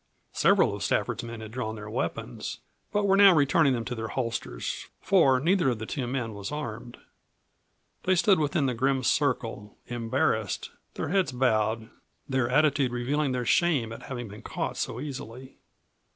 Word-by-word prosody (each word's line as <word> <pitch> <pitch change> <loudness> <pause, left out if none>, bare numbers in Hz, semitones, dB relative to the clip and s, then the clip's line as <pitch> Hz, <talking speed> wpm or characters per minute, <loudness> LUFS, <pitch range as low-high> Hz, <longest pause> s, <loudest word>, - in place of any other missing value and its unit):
Several - - +4
of - - -8
Stafford's - - 0
men 115 -1 -7
had 110 -1 -8
drawn 110 -2 -3
their 105 -1 -8
weapons, - - -4 0.3
but 205 0 +1
were 195 -1 +4
now 195 -2 +8
returning 140 -1 +4
them 115 -2 -2
to 125 - -3
their 110 -2 -4
holsters, 115 - -4
for 140 -10 +4
neither 175 +2 +2
of 120 - -1
the 110 - -5
two 130 +1 -3
men 120 -3 -3
was 100 +2 -6
armed. 120 -5 -6 1.1
They 185 - +4
stood 190 +1 +4
within 150 0 +1
the 130 - +1
grim 130 +2 +1
circle, 120 -7 0
embarrassed, 115 -2 -1 0.2
their - - -3
heads 185 -5 +2
bowed, 115 -2 +1 0.4
their 130 -3 0
attitude 140 -2 +3
revealing 135 +4 0
their 125 -1 -2
shame 140 -11 +2
at - - -9
having 120 -3 -6
been 105 +1 -10
caught - - -4
so 115 - -3
easily. 130 -2 -8
125 Hz, 165 wpm, -27 LUFS, 115-145 Hz, 1.1 s, now